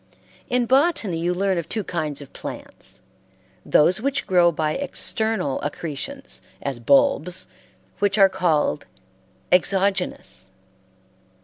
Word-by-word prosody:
In 250 -1 +2
botany 260 - +2
you 175 +2 0
learn 190 0 0
of 165 - -7
two 215 - -1
kinds 155 -6 -3
of 140 - -17
plants - - -7 0.6
those 180 +7 +3
which 275 +2 -1
grow 175 -2 +4
by 155 -1 -1
external 220 - 0
accretions, 165 - -4 0.2
as 135 -4 -4
bulbs, 145 +7 +2 0.5
which, 205 -1 +1
are 195 -2 +7
called 155 - 0 0.6
exogenous? 190 +1 +1
180 Hz, 110 wpm, -23 LUFS, 155-215 Hz, 0.6 s, are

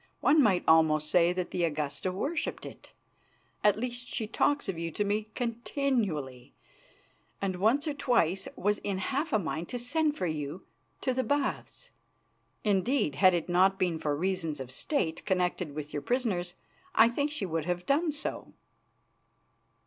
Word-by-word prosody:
One 300 +1 +5
might 195 -8 +3
almost 155 -1 +4
say 175 -1 +5
that 180 0 -3
the 180 - -1
Augusta 155 +3 -1
worshipped 285 - -3
it, - - -11 0.7
at 210 -1 +5
least 245 +1 -4
she 225 - -2
talks 285 +6 +1
of 185 -4 -3
you 165 0 -2
to 205 - -1
me 210 +1 -1
continually, 230 - -2 0.8
and 190 -2 -2
once 240 - +2
or 300 - 0
twice 195 - +1
was 205 +2 0
in 200 -2 -2
half 275 - -2
a - - +4
mind 165 -3 -3
to 245 - -3
send 300 +5 0
for 185 - -1
you 155 +1 -4 0.4
to 260 - 0
the 260 +1 0
Baths. 285 0 -2 0.7
Indeed, 210 - +1
had 180 +6 +5
it 170 - -2
not 185 +2 +4
been 175 -4 0
for 150 -2 0
reasons 165 -3 -2
of 130 -1 -7
State 160 - -1
connected 180 -5 0
with 150 -1 -6
your 145 - -2
prisoners 190 - -1 0.4
I 225 - +7
think 285 +5 -1
she 290 -10 -2
would 165 -3 -2
have 180 0 -2
done 310 +4 +2
so." 295 - -6
190 Hz, 165 wpm, -29 LUFS, 165-245 Hz, 0.8 s, I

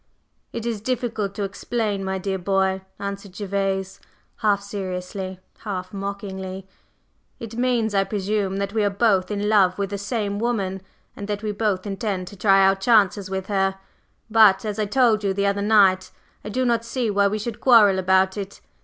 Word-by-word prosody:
"It 230 -1 -5
is 225 -3 -2
difficult 225 -4 -2
to 205 - -2
explain, 205 0 -2
my 190 0 -2
dear 190 0 -3
boy," 190 +1 +1 0.2
answered 200 -1 -6
Gervase, 195 -1 -2 0.4
half 205 -2 +1
seriously, 190 -1 -5 0.2
half 185 -3 -5
mockingly. 195 -1 -6 0.7
"It 225 -1 -8
means, 240 -3 +1
I 195 -1 +3
presume, 200 -1 -1
that 200 0 -3
we 220 -1 +1
are 205 - +3
both 195 -3 +2
in 205 0 -2
love 195 -4 +4
with 200 -1 -2
the 200 - -3
same 205 -1 -2
woman, 200 -5 -1 0.3
and 200 - -7
that 205 0 -3
we 215 - -1
both 205 -2 -1
intend 195 -2 -3
to - - -12
try 195 -1 +4
our 195 0 +4
chances 200 -1 +2
with 190 -1 -3
her. 195 -1 0 0.5
But, 220 -1 +5
as 210 0 -3
I 210 - 0
told 225 -2 +3
you 195 -1 0
the 200 0 0
other 200 0 +1
night, 200 -3 +4 0.3
I 210 - -6
do 255 +5 0
not 235 -1 +1
see 230 -1 -2
why 200 0 +3
we 210 +2 -1
should 215 +1 -5
quarrel 210 -7 +6
about 190 +1 +2
it. 200 -1 -6
200 Hz, 180 wpm, -23 LUFS, 190-215 Hz, 0.7 s, quarrel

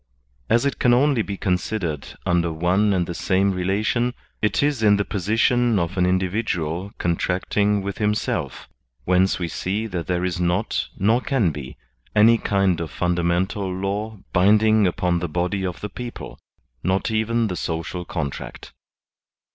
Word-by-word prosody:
As 115 +4 +3
it 140 - -1
can 120 -1 +4
only 135 -1 +3
be 100 -2 -4
considered 90 -5 -2
under 85 -1 +1
one 90 +6 +2
and 90 -3 +1
the 85 - -5
same 95 +3 +1
rela 95 +3 -1
tion, 120 +2 0 0.3
it 105 +5 +1
is 145 -5 +1
in 105 -2 +5
the 100 - 0
position 115 +4 +2
of 85 0 -1
an 90 -1 +2
individual 95 -1 -1
contracting 95 +4 0
with 100 0 -5
himself; 105 0 -1 0.4
whence 95 +1 +3
we 90 - -2
see 100 +6 -2
that 90 -6 -4
there 90 0 0
is 90 -1 -2
not, 90 +4 0
nor 110 +6 +2
can 125 - +1
be, 70 -3 -8 0.4
any 115 +2 +6
kind 95 -4 +1
of 80 - -4
fundamental 90 +2 0
law 100 +4 -3 0.2
binding 105 +2 +4
upon 90 0 0
the 85 -1 -3
body 90 +4 -1
of 90 -2 -4
the 105 - -4
people, 120 +4 -8 0.4
not 95 +4 0
even 115 +1 +1
the 95 -4 -2
social 85 +1 -3
contract. 70 -4 -6
95 Hz, 155 wpm, -22 LUFS, 90-110 Hz, 0.4 s, any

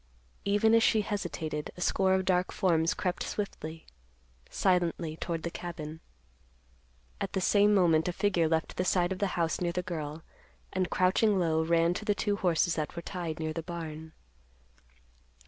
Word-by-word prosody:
Even 205 +2 +3
as 230 - +6
she 220 -1 +4
hesitated, 165 -7 -3
a - - -8
score 190 +1 +2
of 190 0 0
dark 180 -1 +1
forms 165 -3 +2
crept 180 -1 -2
swiftly, 165 -6 -5 0.6
silently 175 -4 +1
toward 165 0 -4
the 170 - -3
cabin. 160 -3 -6 1.2
At - - -3
the - - +1
same 205 +2 +4
moment 165 -4 +4
a - - +1
figure 175 -3 +1
left 160 0 -1
the 180 - +1
side 180 -1 +2
of 185 - -3
the 200 - +1
house 165 0 0
near 175 -1 0
the 180 0 -2
girl, 160 -3 -5 0.5
and, 185 -1 0
crouching 195 +3 +3
low, 160 -3 +2
ran 165 +1 +3
to 200 - -5
the 210 -1 +1
two 205 +1 0
horses 175 -2 +2
that 155 +1 -3
were 170 - -5
tied 170 -4 -4
near 155 -1 -2
the 165 - -3
barn. 160 -2 -7
175 Hz, 170 wpm, -30 LUFS, 160-190 Hz, 1.2 s, as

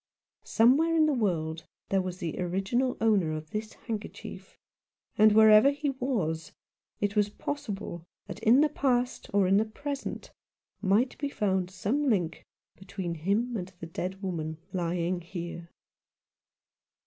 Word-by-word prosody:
Somewhere 280 +9 +4
in 315 -1 +5
the 305 - +2
world 165 - -1 0.2
there 195 -1 +2
was 185 -1 -5
the 165 -3 -4
original 195 +8 0
owner 205 -8 +2
of 155 0 -6
this 215 0 -4
handkerchief; 220 -3 -7 0.6
and, 215 +1 +6
wherever 220 +3 +8
he 285 0 -1
was, 215 - -2 0.5
it 205 0 -1
was 210 -1 +3
possible 205 - -5 0.2
that - - -8
in 245 +6 +5
the 305 - +4
past 250 -4 0
or 200 -1 +3
in 190 +2 +4
the 215 - +4
present 280 +5 -6 0.5
might 210 +6 +2
be 285 - -1
found 190 -7 0
some 260 +9 0
link 175 -7 -1 0.3
between 190 -2 -5
him 200 +9 0
and 185 -3 -4
the - - -6
dead 185 +4 -5
woman 160 -4 -3 0.2
lying 175 0 -1
here. 170 -1 -7
205 Hz, 140 wpm, -29 LUFS, 175-245 Hz, 0.6 s, wherever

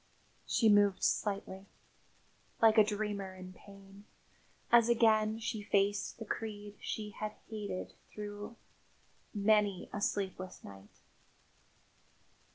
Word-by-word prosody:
She 225 - +3
moved 205 -2 +4
slightly, 195 -1 -1 0.9
like 220 -1 +6
a - - +9
dreamer 205 -2 -3
in 185 0 -10
pain, 195 +1 -15 0.7
as 235 -1 +6
again 220 -2 +4
she 225 -1 -3
faced 205 0 +1
the 225 - -7
creed 205 -1 -5
she 210 -1 -4
had 215 +1 -5 0.2
hated 205 -4 -5 0.2
through 210 +2 -7 0.8
many 205 -2 +2
a 205 - -3
sleepless 190 -2 -3
night. 100 0 -13
205 Hz, 105 wpm, -33 LUFS, 195-215 Hz, 0.9 s, a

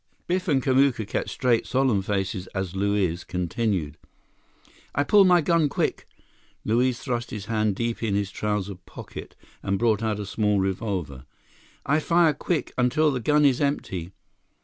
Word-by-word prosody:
Biff 185 +2 -1
and 135 -5 +2
Kamuka 130 -5 +2
kept - - -2
straight, 120 -3 +1
solemn 130 -5 +2
faces 95 -1 -2
as 95 -1 -3
Luiz 95 -3 0
continued. 90 -3 -2 1.0
"I 140 - +2
pull 200 +6 +5
my 180 -2 +5
gun 160 -1 +2
quick!" - - -2 0.6
Luiz 120 +3 +2
thrust 120 -3 -3
his 105 -2 -6
hand 110 -2 0
deep 115 +2 -2
in 110 -4 0
his 100 -1 -1
trouser 105 -1 -2
pocket 90 -2 -11 0.3
and 95 0 -1
brought 110 -1 +2
out 110 -2 -1
a 105 - -4
small 105 0 +1
revolver. 95 - -3 0.6
"I 150 +2 +2
fire 165 0 +3
quick, 155 +2 -2
until 145 +5 +3
the 130 - -2
gun 150 +5 +3
is 135 -1 +3
empty." 95 - -2
110 Hz, 155 wpm, -25 LUFS, 95-135 Hz, 1.0 s, pull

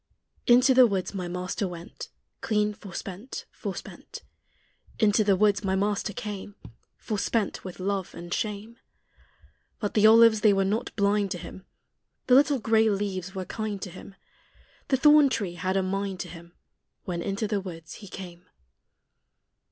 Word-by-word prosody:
Into 250 +2 +6
the 255 -1 +7
woods 195 -3 -2
my 185 -3 -4
Master 180 +3 -3
went, 175 -1 -9 0.3
Clean 210 -1 +1
forspent, 195 +4 -8
forspent. - - -8 0.7
Into 215 0 +3
the 200 -2 +3
woods 205 +1 +2
my 190 -1 0
Master 205 +2 0
came, 205 0 -6 0.4
Forspent 215 0 -2
with 185 -1 -8
love 195 -1 -2
and 175 +1 -6
shame. 215 +3 -4 1.0
But 205 -3 -3
the 215 0 +5
olives 225 -1 +7
they 210 -2 +5
were 195 0 +2
not 215 +5 -1
blind 200 -1 +2
to - - -5
Him; 190 +2 -10 0.6
The 255 - +3
little 280 +2 +5
gray 225 -1 +3
leaves 195 -2 -3
were 190 -1 -4
kind 215 -1 -4
to 185 - -6
Him; 195 - -12 0.7
The 265 - +2
thorn 295 +1 +6
tree 200 -8 -2
had 185 +3 -1
a 190 - +1
mind 195 0 -2
to - - -7
Him 170 0 -12 0.5
When 175 -2 -4
into 200 +4 -2
the 205 -1 -1
woods 165 -4 -9
He 200 - -10
came. 180 -2 -10
200 Hz, 155 wpm, -27 LUFS, 185-220 Hz, 1.0 s, the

